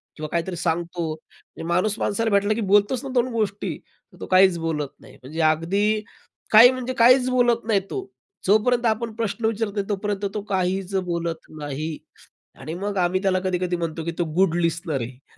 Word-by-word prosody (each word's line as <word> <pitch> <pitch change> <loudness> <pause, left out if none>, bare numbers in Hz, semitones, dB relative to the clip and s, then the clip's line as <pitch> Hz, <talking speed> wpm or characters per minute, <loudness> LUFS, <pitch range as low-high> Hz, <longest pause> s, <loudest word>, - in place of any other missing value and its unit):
किंवा 155 -1 -5
काहीतरी 170 +2 -2
सांगतो. 170 +1 -2
म्हणजे 160 - -15
माणूस 185 +5 +1
माणसाला 225 +2 0
भेटला, 200 +1 +3
की 230 - -3
बोलतोच 205 +5 +2
ना 275 - -5
दोन 245 -1 +2
गोष्टी. 210 -3 -2 0.4
तर - - -17
तो - - -6
काहीच 185 -1 +5
बोलत 160 -3 -2
नाही. - - -16
म्हणजे 155 +6 -4
अगदी 200 +7 +1 0.5
काही 230 +3 +9
म्हणजे 255 0 -4
काहीच 250 +1 +5
बोलत 240 -2 +2
नाही 215 -3 +3
तो. 390 - -3 0.5
जोपर्यंत 240 +4 +3
आपण 225 0 0
प्रश्न 225 0 -2
विचारत 220 -1 -1
नाही 200 -1 -1
तोपर्यंत 205 0 -2
तो 210 - -3
काहीच 190 0 -1
बोलत 170 -2 -3
नाही. 150 +2 -4 0.6
आणि 155 - -6
मग 200 +3 -3
आम्ही 180 +1 +1
त्याला 190 -2 +2
कधी-कधी 180 -1 -1
म्हणतो, 165 -1 -3
की 170 - -1
तो 175 - +2
गुड 185 -2 +3
लिस्टनर 165 -4 -1
आहे. 125 +3 -10
195 Hz, 180 wpm, -23 LUFS, 170-220 Hz, 0.6 s, काही